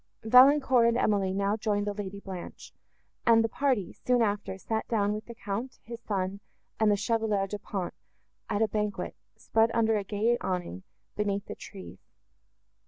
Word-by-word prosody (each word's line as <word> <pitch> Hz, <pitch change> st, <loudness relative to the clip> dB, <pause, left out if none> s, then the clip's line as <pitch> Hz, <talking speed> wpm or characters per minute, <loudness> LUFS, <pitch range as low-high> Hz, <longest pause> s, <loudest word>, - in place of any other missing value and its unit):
Valancourt 255 Hz, +1 st, +6 dB
and 235 Hz, 0 st, +2 dB
Emily 200 Hz, -5 st, +1 dB
now 200 Hz, +2 st, 0 dB
joined 205 Hz, -2 st, -1 dB
the 205 Hz, -, -2 dB
Lady 200 Hz, -1 st, -6 dB
Blanche; 190 Hz, -3 st, -9 dB, 0.5 s
and 225 Hz, -1 st, +5 dB
the -, -, +2 dB
party, 250 Hz, -5 st, 0 dB
soon 250 Hz, -2 st, +1 dB
after, 205 Hz, -2 st, -2 dB
sat 220 Hz, +3 st, -3 dB
down 210 Hz, -3 st, +1 dB
with 215 Hz, +1 st, -5 dB
the 235 Hz, -, -9 dB
Count, 225 Hz, +5 st, -5 dB
his 235 Hz, 0 st, -8 dB
son, 195 Hz, -2 st, -2 dB, 0.4 s
and 220 Hz, -1 st, +4 dB
the 205 Hz, -, +4 dB
Chevalier 215 Hz, -2 st, 0 dB
Du 205 Hz, +1 st, -5 dB
Pont, 190 Hz, -3 st, -4 dB, 0.6 s
at 205 Hz, +2 st, +1 dB
a -, -, +3 dB
banquet, 210 Hz, -1 st, -2 dB, 0.2 s
spread 225 Hz, 0 st, +2 dB
under 225 Hz, -1 st, +3 dB
a 205 Hz, -, -2 dB
gay 220 Hz, +4 st, +1 dB
awning, 175 Hz, -, -3 dB, 0.3 s
beneath 200 Hz, -1 st, -1 dB
the -, -, -6 dB
trees. 195 Hz, -2 st, -11 dB
210 Hz, 170 wpm, -29 LUFS, 200-230 Hz, 0.6 s, Valancourt